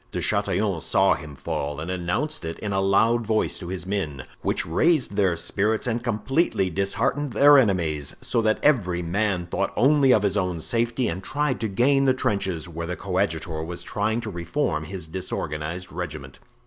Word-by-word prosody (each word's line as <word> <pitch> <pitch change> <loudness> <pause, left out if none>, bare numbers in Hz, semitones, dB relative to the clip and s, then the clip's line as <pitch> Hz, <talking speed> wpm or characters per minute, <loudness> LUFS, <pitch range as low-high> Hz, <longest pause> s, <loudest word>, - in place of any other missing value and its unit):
De - - -3
Chatillon - - +1
saw - - +3
him 75 -3 -7
fall 70 +2 -4
and 80 +4 -4
announced 95 - -2
it 80 0 -5
in 100 -1 -4
a 95 - +1
loud 110 +5 +3
voice 110 0 0
to 90 - -7
his 90 0 -4
men, 80 -9 -3 0.2
which - - -1
raised 135 - +2
their 95 -4 +2
spirits 105 +6 0
and 120 -1 -1
completely 120 - 0
disheartened 105 - -1
their 145 +6 +7
enemies, 85 - +2
so 115 - 0
that 110 -1 +2
every 90 -12 +2
man 95 +1 0
thought 85 - -2
only 140 0 +4
of 105 -4 +4
his 100 -1 +1
own 90 -4 -1
safety 120 +7 0
and 90 +3 -4
tried 145 +1 -1
to 110 - -1
gain 135 +7 +3
the 130 -1 +4
trenches, 95 -9 -1
where 85 0 -5
the 90 - -3
coadjutor 85 -5 -1
was 85 +1 -5
trying 110 +4 -1
to 115 -2 -5
reform 85 - -2
his 90 0 -6
disorganized 85 0 -4
regiment. 80 -6 -6
95 Hz, 180 wpm, -24 LUFS, 85-115 Hz, 0.2 s, their